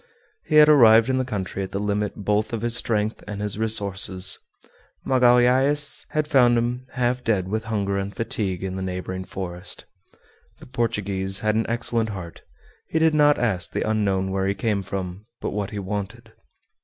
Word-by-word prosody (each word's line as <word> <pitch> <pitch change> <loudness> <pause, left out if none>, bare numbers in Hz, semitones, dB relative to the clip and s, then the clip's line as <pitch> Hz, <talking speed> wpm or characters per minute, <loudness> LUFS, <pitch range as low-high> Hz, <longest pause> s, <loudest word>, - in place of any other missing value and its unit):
He 155 - 0
had 150 0 +8
arrived 115 -5 +6
in 130 - 0
the - - +1
country 100 -5 -4
at 95 - -5
the 100 - -2
limit 105 0 -1
both 105 +2 -1
of 115 -1 -3
his 120 0 +1
strength 110 -2 -1
and 105 -1 -6
his 105 0 -3
resources. 100 -4 +2 0.7
Magalhaës 130 +3 +3
had 155 -1 -1
found 125 -5 +4
him 120 +2 -2
half 125 -1 -1
dead 100 -5 0
with 110 +3 -3
hunger 100 -3 -1
and 100 +1 -4
fatigue 95 -3 -3
in 95 -1 -4
the - - -4
neighboring 95 0 -5
forest. 90 -1 -7 0.7
The - - -14
Portuguese 100 -6 -2
had 110 0 +1
an 110 +1 0
excellent 115 -1 0
heart; 95 -5 -8 0.5
he - - -1
did 160 0 +3
not 145 -1 +4
ask 100 -7 0
the - - -3
unknown 100 -3 0
where 95 0 -1
he 100 - 0
came 105 -3 -1
from, 95 +1 -6
but - - -4
what 100 -1 -3
he 105 - -7
wanted. 105 +3 -6
105 Hz, 180 wpm, -23 LUFS, 95-120 Hz, 0.7 s, had